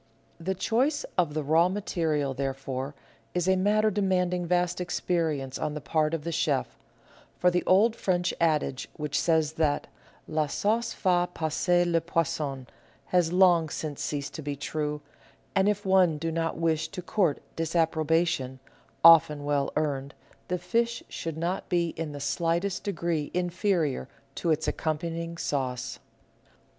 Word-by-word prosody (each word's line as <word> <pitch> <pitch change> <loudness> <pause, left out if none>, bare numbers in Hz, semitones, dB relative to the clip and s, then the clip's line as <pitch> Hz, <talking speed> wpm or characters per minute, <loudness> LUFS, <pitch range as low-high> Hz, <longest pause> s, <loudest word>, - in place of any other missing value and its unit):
The 190 +3 -2
choice 260 - +1
of 165 -5 +1
the 155 - -1
raw 160 +5 +4
material, 160 -8 -1
therefore, 135 0 -4 0.4
is 180 0 0
a 190 - +4
matter 210 +3 +3
demanding 180 -3 0
vast 180 0 +1
experience 160 -6 -1
on 150 -1 -2
the - - -3
part 155 +2 0
of 155 - -5
the 170 - -3
chef; 150 -4 -1 0.6
for 180 - +3
the 180 0 +1
old 215 +5 +5
French 180 -4 0
adage 150 -5 +1
which 150 -1 -1
says 160 -2 +2
that 145 -2 +1 0.2
" - - -30
La 155 -1 +3
sauce 220 +10 0
fait 180 -2 +1
passer 175 +3 +1
le 170 -1 +2
poisson 150 -5 -2 0.2
" - - -32
has 175 -2 +3
long 175 -3 +5
since 150 -1 -5
ceased 145 -2 -3
to 160 - -6
be 145 -1 -3
true, 150 +1 -3 0.5
and 195 +1 +3
if 205 0 -1
one 185 -4 +4
do 165 +2 -2
not 165 0 -1
wish 160 -1 +1
to 185 -3 -7
court 180 -5 +1 0.2
disapproba 165 0 +2
tion— 130 -5 -3 0.4
often 160 -3 +7
well 145 -1 0
earned 140 -2 -1 0.2
— - - -33
the 180 - -1
fish 230 +7 -1
should 165 -2 -5
not 175 +4 -2
be 170 -2 +1
in 160 -2 -5
the 145 - -7
slightest 170 +6 -1
degree 170 -6 -2
inferior 175 - 0 0.2
to 170 - -2
its 160 0 +1
accompanying 165 +1 -2
sauce. 130 -6 -2
165 Hz, 155 wpm, -27 LUFS, 150-180 Hz, 0.6 s, often